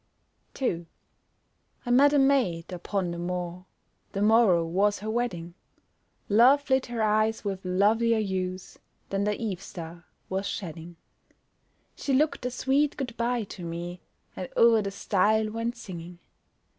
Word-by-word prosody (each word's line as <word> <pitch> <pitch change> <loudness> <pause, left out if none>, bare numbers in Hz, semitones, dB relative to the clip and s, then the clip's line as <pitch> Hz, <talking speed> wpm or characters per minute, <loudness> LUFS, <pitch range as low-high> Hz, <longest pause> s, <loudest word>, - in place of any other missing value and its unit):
2 175 -10 -2 1.0
I 245 - -1
met 280 +4 +6
a 290 - +3
maid 245 -12 +2
upon 180 0 -2
the 170 - -5
moor, 180 0 -4 0.5
The 200 - 0
morrow 210 -6 +5
was 200 +5 +1
her 215 +3 -4
wedding. 180 -8 -2 0.7
Love 255 +7 +5
lit 265 0 +3
her 235 -2 -2
eyes 215 +1 +1
with 195 -2 -3
lovelier 215 +5 +2
hues 185 -2 -3 0.3
Than 195 +1 -1
the 210 0 -1
eve 205 -6 -3
star 170 0 -9 0.2
was 190 +1 -2
shedding. 170 -2 -6 1.0
She 275 - -2
looked 285 -2 +1
a - - -1
sweet 270 +4 +1
good 250 -4 -4
bye 235 0 0
to 195 -2 -9
me, 170 +1 -6 0.3
And 185 - -6
o'er 230 -1 +6
the 200 - -3
stile 215 +2 +1
went 230 +2 -3
singing. 175 -5 -9
205 Hz, 145 wpm, -27 LUFS, 180-235 Hz, 1.0 s, met